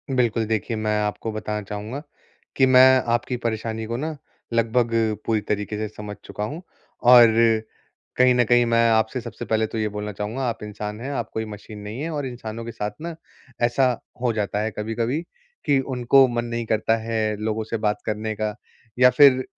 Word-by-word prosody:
बिल्कुल, 115 Hz, -2 st, +1 dB
देखिए 110 Hz, +1 st, -1 dB
मैं 105 Hz, 0 st, 0 dB
आपको 105 Hz, +2 st, -2 dB
बताना 105 Hz, 0 st, -3 dB
चाहूँगा, 105 Hz, +7 st, -6 dB, 0.5 s
कि 130 Hz, -, +5 dB
मैं 130 Hz, 0 st, +7 dB
आपकी 120 Hz, +1 st, -1 dB
परेशानी 110 Hz, -1 st, -3 dB
को 115 Hz, +1 st, -3 dB
ना 155 Hz, +3 st, -4 dB, 0.4 s
लगभग 115 Hz, +1 st, +2 dB, 0.3 s
पूरी 110 Hz, -2 st, +1 dB
तरीक़े 105 Hz, 0 st, -3 dB
से 110 Hz, 0 st, -2 dB
समझ 105 Hz, -1 st, -7 dB
चुका 105 Hz, -, -5 dB
हूँ। 150 Hz, +11 st, -5 dB, 0.5 s
और 120 Hz, -2 st, +10 dB, 0.9 s
कहीं 125 Hz, 0 st, +6 dB
न 125 Hz, -, +4 dB
कहीं 120 Hz, +1 st, +4 dB
मैं 115 Hz, 0 st, +3 dB
आपसे 110 Hz, +3 st, +1 dB
सबसे 120 Hz, +1 st, -7 dB
पहले 110 Hz, +1 st, +1 dB
तो 115 Hz, -, -6 dB
ये 110 Hz, -1 st, 0 dB
बोलना 105 Hz, 0 st, -5 dB
चाहूँगा 105 Hz, +7 st, -4 dB
आप 115 Hz, -, -6 dB
इंसान 105 Hz, 0 st, -6 dB
हैं 135 Hz, +3 st, -4 dB
आप -, -, -3 dB
कोई 110 Hz, -, -2 dB
मशीन 105 Hz, 0 st, -9 dB
नहीं 105 Hz, +5 st, -7 dB
है, 160 Hz, -, -3 dB
और 150 Hz, -3 st, -3 dB
इंसानों 115 Hz, -2 st, -7 dB
के 115 Hz, -, -5 dB
साथ 105 Hz, -2 st, -4 dB
ना 170 Hz, 0 st, -5 dB, 0.5 s
ऐसा 125 Hz, +2 st, +2 dB, 0.3 s
हो 125 Hz, -2 st, +1 dB
जाता 105 Hz, -1 st, -1 dB
है 110 Hz, -, -1 dB
कभी-कभी, 115 Hz, +7 st, -1 dB, 0.4 s
कि 140 Hz, -2 st, +3 dB
उनको 130 Hz, 0 st, +4 dB
मन 120 Hz, -1 st, -2 dB
नहीं 115 Hz, 0 st, -3 dB
करता 110 Hz, +1 st, +1 dB
है 110 Hz, -1 st, -1 dB
लोगों 110 Hz, +1 st, -2 dB
से 115 Hz, +1 st, -3 dB
बात 105 Hz, -1 st, -1 dB
करने 110 Hz, +1 st, -2 dB
का। 105 Hz, 0 st, -2 dB, 0.4 s
या 125 Hz, -, +8 dB
फिर 130 Hz, 0 st, +6 dB
115 Hz, 190 wpm, -23 LUFS, 105-125 Hz, 0.9 s, और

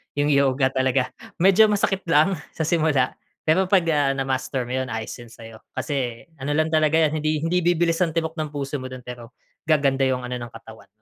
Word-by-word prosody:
'Yung 145 Hz, +1 st, +1 dB
yoga 135 Hz, -1 st, +2 dB
talaga. 130 Hz, -1 st, 0 dB, 0.2 s
Medyo 195 Hz, +5 st, +5 dB
masakit 200 Hz, -2 st, 0 dB
lang 165 Hz, +2 st, +3 dB, 0.2 s
sa 160 Hz, -, -1 dB
simula 155 Hz, -5 st, +2 dB, 0.4 s
pero 165 Hz, +5 st, +4 dB
'pag 190 Hz, -2 st, +4 dB
ah, 145 Hz, -3 st, +2 dB
na-master 135 Hz, -1 st, -2 dB
mo, 125 Hz, -, -3 dB
ayos 115 Hz, -3 st, -5 dB
'yon 120 Hz, -1 st, -12 dB
sa 115 Hz, -, -13 dB
'yo. 110 Hz, -1 st, -11 dB, 0.2 s
Kasi 125 Hz, -6 st, -3 dB, 0.2 s
ano 135 Hz, +3 st, -3 dB
lang 155 Hz, +1 st, +1 dB
talaga 155 Hz, 0 st, +3 dB
'yan, 155 Hz, -1 st, +2 dB
hindi 155 Hz, 0 st, -1 dB
hindi 180 Hz, +2 st, +1 dB
bibilis 170 Hz, -1 st, +1 dB
ang 165 Hz, -1 st, -2 dB
tibok 160 Hz, 0 st, -1 dB
ng 155 Hz, -1 st, -3 dB
puso 140 Hz, -1 st, -4 dB
mo 130 Hz, -, -6 dB
dun, 130 Hz, -1 st, -9 dB
pero 120 Hz, -1 st, -10 dB, 0.3 s
gaganda 140 Hz, -3 st, +2 dB
'yung 125 Hz, -1 st, -1 dB
ano 125 Hz, 0 st, -4 dB
ng 120 Hz, -1 st, -8 dB
katawan. 110 Hz, -2 st, -13 dB
145 Hz, 200 wpm, -23 LUFS, 130-160 Hz, 0.4 s, Medyo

